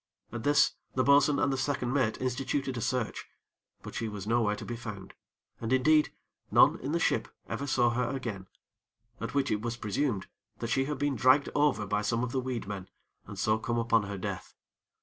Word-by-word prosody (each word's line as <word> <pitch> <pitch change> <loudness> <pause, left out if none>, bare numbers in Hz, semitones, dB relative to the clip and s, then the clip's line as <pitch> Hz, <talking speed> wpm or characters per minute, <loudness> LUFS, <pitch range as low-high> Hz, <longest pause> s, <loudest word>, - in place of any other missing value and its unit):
At 120 - -4
this, 145 0 +4 0.2
the 130 - +3
bo'sun 140 +1 +5
and 140 - +2
the 135 - -2
second 130 -3 -1
mate 130 -6 +1
instituted 130 +1 -1
a 115 - -3
search; 125 -1 -2 0.6
but - - -8
she 115 - -2
was 105 -3 -6
nowhere 110 -2 +2
to - - -8
be 120 - -4
found, 105 -5 -8 0.5
and, 115 +1 -4
indeed, 150 +4 +4 0.4
none - - +5
in 135 - -4
the 170 - +1
ship 115 -8 +1 0.2
ever 140 - -4
saw 120 -3 +3
her 125 0 0
again, 115 -8 -4 0.7
at 115 - -5
which 140 -1 +1
it 105 - 0
was 120 +1 -3
presumed 110 -1 -1 0.3
that 115 - -4
she 135 +3 +2
had 150 0 -3
been 145 0 0
dragged 130 +5 +4
over 145 -8 +2
by 105 +1 0
some 115 +3 0
of 125 - -2
the 130 - 0
weed 125 -3 -3
men, 95 -2 -6 0.4
and - - -8
so 110 0 +2
come 120 +1 -2
upon 115 -1 +3
her 100 -1 -5
death. 95 - -5
120 Hz, 205 wpm, -30 LUFS, 110-135 Hz, 0.7 s, bo'sun